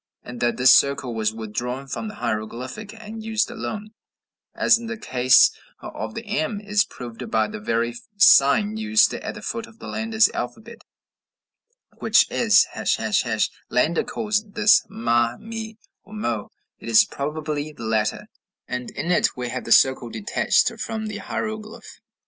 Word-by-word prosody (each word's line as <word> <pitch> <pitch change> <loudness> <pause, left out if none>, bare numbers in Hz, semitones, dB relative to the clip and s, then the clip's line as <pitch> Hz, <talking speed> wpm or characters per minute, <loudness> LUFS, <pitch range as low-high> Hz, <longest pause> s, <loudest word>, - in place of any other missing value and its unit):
And 120 0 -9
that 120 -1 0
this 125 +1 +7
circle 140 -3 +2
was 110 -1 0
withdrawn 120 +4 -5
from 180 +10 -5
the 210 - -8
hieroglyph, 115 +2 -4
and 220 +1 -9
used 220 +1 0
alone, 215 -2 -6 0.6
as 230 -1 +4
in 235 - -8
the 225 -1 -5
case 130 - +4 0.3
of 110 0 -7
the 230 - -6
m, 205 0 -2
is 210 -1 +1
proved 120 -2 -9
by 110 -1 +1
the 105 - -7
very 115 +2 -1 0.2
sign 200 +4 +5
used 220 0 +3
at - - -5
the - - -10
foot 230 0 -4
of 225 - -19
Landa's 220 -1 +1
alphabet, 220 - -6 1.2
which - - +4
is, - - +4
### - - 0 0.2
Landa 460 - +1
calls 210 -1 -1
this 210 0 +4
ma, 120 +1 0
me, 225 -1 -7 0.3
or 210 - -16
mo; 120 - -3 0.3
it - - -8
is 115 - +6
probably 150 +1 -4
the 145 - -11
latter, 110 -1 -1 0.4
and 125 0 -4
in 170 - -3
it 175 - +2
we 125 -1 -3
have 125 +1 -5
the - - -6
circle 130 -2 +4
detached 110 -3 +1
from 220 -1 -4
the 210 -1 -5
hieroglyph. 215 +2 -6
150 Hz, 155 wpm, -23 LUFS, -, 1.2 s, this